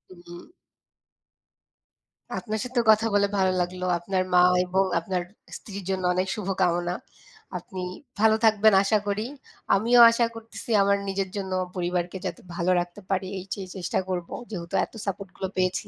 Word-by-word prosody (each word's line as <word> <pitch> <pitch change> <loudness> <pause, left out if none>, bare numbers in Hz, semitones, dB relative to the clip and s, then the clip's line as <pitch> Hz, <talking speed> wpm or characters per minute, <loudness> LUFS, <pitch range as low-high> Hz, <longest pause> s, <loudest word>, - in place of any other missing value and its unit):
উম 175 - -12 1.9
আপনার 215 -1 -4
সাথেও 250 -1 0
কথা 220 +1 +3
বলে 200 0 +4
ভালো 190 -1 +3
লাগলো। 180 +1 -3
আপনার 185 +1 -1
মা 180 0 +7 0.2
এবং 190 +2 +2 0.2
আপনার 180 +1 -2 0.4
স্ত্রীর 200 -2 -8
জন্য 190 -1 -1
অনেক 185 +1 0
শুভকামনা। 180 -3 0 0.6
আপনি 185 +1 -7 0.4
ভালো 220 0 +5
থাকবেন 220 -1 +5
আশা 215 +2 +3
করি। 205 +2 -1 0.5
আমিও 235 +5 +4
আশা 235 0 +2
করতেসি 225 +1 -8
আমার 200 0 +3
নিজের 195 -1 -2
জন্য 190 -1 -4
ও - - -1
পরিবারকে 180 0 -2
যাতে 245 - -4
ভালো 175 +2 +1
রাখতে 175 +4 -5
পারি, 190 -1 0
এই 185 - -9
সেই 190 -2 -6
চেষ্টা 185 0 -1
করব। 175 -2 -2 0.2
যেহেতু 170 -5 -5
এত - - -26
সাপোর্টগুলো 195 -1 -4
পেয়েছি। 185 0 0
190 Hz, 150 wpm, -26 LUFS, 180-205 Hz, 1.9 s, মা